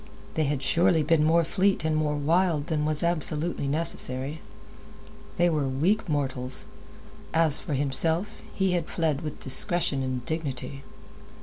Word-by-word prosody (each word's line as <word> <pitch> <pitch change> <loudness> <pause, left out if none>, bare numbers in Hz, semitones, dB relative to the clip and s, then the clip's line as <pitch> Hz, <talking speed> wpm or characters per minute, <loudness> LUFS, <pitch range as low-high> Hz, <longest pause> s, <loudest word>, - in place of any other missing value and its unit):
They 155 - 0
had 140 -1 -2
surely 165 +1 +2
been 155 0 +2
more 165 +2 +3
fleet 190 +1 0
and 160 -1 0
more 150 -1 0
wild 160 +1 +1
than 150 -2 -2
was 155 +1 +2
absolutely 165 -2 -1
necessary. 145 -2 0 1.0
They 175 - +3
were 150 -5 0
weak 170 +11 0
mortals. 130 -3 -3 0.7
As 160 -3 +5
for 150 - -4
himself, 160 +7 -1
he 190 -1 0
had 175 -2 -2
fled 155 -4 -1
with 150 -2 -7
discretion 145 +1 +3
and 130 -2 -4
dignity. 140 -3 -5
155 Hz, 140 wpm, -26 LUFS, 140-170 Hz, 1.0 s, As